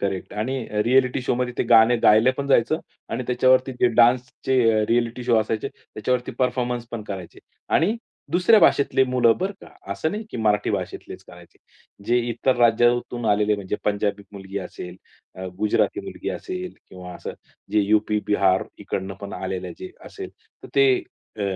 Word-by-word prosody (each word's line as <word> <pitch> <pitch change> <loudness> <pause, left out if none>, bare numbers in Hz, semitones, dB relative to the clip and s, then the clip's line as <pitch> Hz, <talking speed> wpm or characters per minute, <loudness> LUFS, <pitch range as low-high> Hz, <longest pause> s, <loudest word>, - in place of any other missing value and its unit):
Correct 95 -2 -3
आणि 130 +5 -2 0.3
reality 130 +1 +3
शोमध्ये 125 0 -1
ते - - +3
गाणं 115 +1 +6
गायला 110 +4 +6
पण 140 - -3
जायचं 135 +4 +2 0.3
आणि - - -3
त्याच्यावरती 130 +1 +3
जे 125 - +5
डान्सचे 120 -2 +3
रिएलिटी 120 +1 0
शो 120 -2 +3
असायचे 110 0 -2
त्याच्यावरती 125 +3 -4
परफॉर्मन्स 125 -1 -1
पण 115 -2 -5
करायचे 95 -4 -7 0.4
आणि 200 +9 +2 0.4
दुसऱ्या 185 +6 +5
भाषेतले 140 -1 +4
मुलं 125 -3 +3
बरं 190 +2 -2
का. - - -13 0.3
असं 160 +10 -2
नाही, 210 +2 -5
की - - -6
मराठी 105 -2 +1
भाषेतलेच - - -5
करायचे. - - -16 0.5
जे 120 +1 +3
इतर 120 +2 0
राज्यातून 120 0 +2
आलेले 105 +1 +2
म्हणजे 100 0 -4
पंजाबी 100 0 -1
मुलगी 100 0 -6
असेल, 90 -1 -8 0.4
अ, 95 0 -7
गुजराती 105 - +1
मुलगी - - -7
असेल 185 -1 -5 0.2
किंवा 90 -1 -10
असं - - -7 0.4
जे 105 - +4
यू-पी, 105 +1 +1
बिहार 95 -2 +2
इकडनं 95 0 -4
पण 100 0 -7
आलेले 95 -1 -4
जे 370 +1 -8 0.2
असेल. 385 -2 -8 0.3
तर - - -10
ते 410 0 +5 0.5
अ, 105 - -4
120 Hz, 160 wpm, -23 LUFS, 105-130 Hz, 0.5 s, गाणं